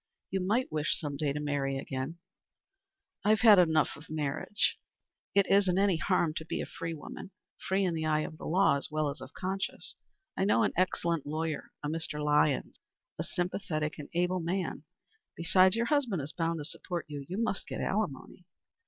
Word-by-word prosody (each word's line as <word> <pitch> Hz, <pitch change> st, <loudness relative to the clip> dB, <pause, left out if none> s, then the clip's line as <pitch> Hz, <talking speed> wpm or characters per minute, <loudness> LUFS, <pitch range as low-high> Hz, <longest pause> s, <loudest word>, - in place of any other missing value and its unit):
You 190 Hz, -, 0 dB
might 215 Hz, +8 st, +1 dB
wish 155 Hz, 0 st, 0 dB
some 145 Hz, -3 st, -3 dB
day 145 Hz, 0 st, 0 dB
to 145 Hz, -, -3 dB
marry 140 Hz, -2 st, -1 dB
again." 135 Hz, +4 st, -4 dB, 1.1 s
"I 205 Hz, -, +2 dB
have 215 Hz, 0 st, +4 dB
had 215 Hz, -5 st, +9 dB
enough 160 Hz, -3 st, +3 dB
of 155 Hz, -, -14 dB
marriage." 155 Hz, +7 st, -1 dB, 0.6 s
"It 200 Hz, -1 st, +6 dB
isn't 195 Hz, -2 st, +4 dB
any 195 Hz, -3 st, +3 dB
harm 170 Hz, -2 st, +1 dB
to -, -, -3 dB
be -, -, -2 dB
a -, -, -2 dB
free 165 Hz, 0 st, -5 dB
woman 155 Hz, -, -8 dB, 0.4 s
free 190 Hz, +1 st, +2 dB
in 175 Hz, -, +1 dB
the 160 Hz, -1 st, -1 dB
eye 155 Hz, 0 st, +2 dB
of 155 Hz, 0 st, -6 dB
the -, -, -6 dB
law 180 Hz, -4 st, +4 dB
as 140 Hz, -, -2 dB
well 155 Hz, -1 st, 0 dB
as 140 Hz, -, -7 dB
of -, -, -9 dB
conscience. 190 Hz, +1 st, -4 dB, 0.4 s
I -, -, 0 dB
know 205 Hz, +3 st, +4 dB
an 210 Hz, -, +1 dB
excellent 170 Hz, -4 st, 0 dB
lawyer 155 Hz, +1 st, -2 dB
a -, -, -1 dB
Mr. 155 Hz, -1 st, -3 dB
Lyons, 150 Hz, -1 st, +2 dB, 0.4 s
a -, -, 0 dB
sympathetic 160 Hz, -4 st, -2 dB
and 145 Hz, -, -7 dB
able 180 Hz, +1 st, +2 dB
man. 180 Hz, +3 st, -2 dB, 0.5 s
Besides 185 Hz, +3 st, +5 dB
your 230 Hz, 0 st, +1 dB
husband 255 Hz, -, +1 dB
is 150 Hz, +3 st, -6 dB
bound 165 Hz, 0 st, 0 dB
to 150 Hz, -, -5 dB
support 175 Hz, +1 st, -4 dB
you. 145 Hz, -2 st, -6 dB
You 185 Hz, -, -3 dB
must 230 Hz, -3 st, -1 dB
get -, -, -5 dB
alimony." 180 Hz, -4 st, -2 dB
165 Hz, 190 wpm, -31 LUFS, 150-190 Hz, 1.1 s, had